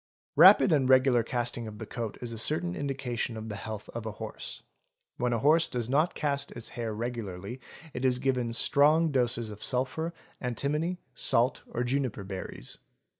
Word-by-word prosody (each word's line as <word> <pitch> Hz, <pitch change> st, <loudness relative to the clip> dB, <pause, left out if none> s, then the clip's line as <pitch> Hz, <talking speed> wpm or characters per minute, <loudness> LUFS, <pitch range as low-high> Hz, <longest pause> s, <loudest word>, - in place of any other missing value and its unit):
Rapid 195 Hz, -, +8 dB
and 135 Hz, -4 st, +3 dB
regular 130 Hz, -2 st, +5 dB
casting 120 Hz, 0 st, -2 dB
of 105 Hz, -1 st, -8 dB
the -, -, -6 dB
coat 115 Hz, -3 st, -5 dB
is 120 Hz, -, -4 dB
a 115 Hz, -, -6 dB
certain 175 Hz, +8 st, -1 dB
indication 130 Hz, -6 st, -3 dB
of 110 Hz, 0 st, -6 dB
the 105 Hz, -, -4 dB
health 105 Hz, 0 st, -6 dB
of 115 Hz, -1 st, -6 dB
a 110 Hz, -, -4 dB
horse; -, -, -7 dB, 0.5 s
when 125 Hz, 0 st, 0 dB
a 120 Hz, -, +2 dB
horse 155 Hz, +7 st, +4 dB
does 120 Hz, -1 st, -3 dB
not 155 Hz, +5 st, +2 dB
cast 140 Hz, -2 st, -1 dB
its 115 Hz, -1 st, -5 dB
hair 115 Hz, -2 st, -4 dB
regularly, 110 Hz, -1 st, -5 dB, 0.3 s
it 125 Hz, -, -4 dB
is 130 Hz, -1 st, +3 dB
given 125 Hz, -2 st, 0 dB
strong 150 Hz, +7 st, +4 dB
doses 120 Hz, -4 st, 0 dB
of 105 Hz, -, -9 dB
sulphur, 135 Hz, +6 st, 0 dB, 0.3 s
antimony, 150 Hz, +8 st, -1 dB, 0.2 s
salt, 120 Hz, +3 st, +2 dB
or 120 Hz, -, -2 dB
juniper 125 Hz, -4 st, -1 dB
berries. 95 Hz, -10 st, -7 dB
125 Hz, 175 wpm, -29 LUFS, 115-140 Hz, 0.5 s, Rapid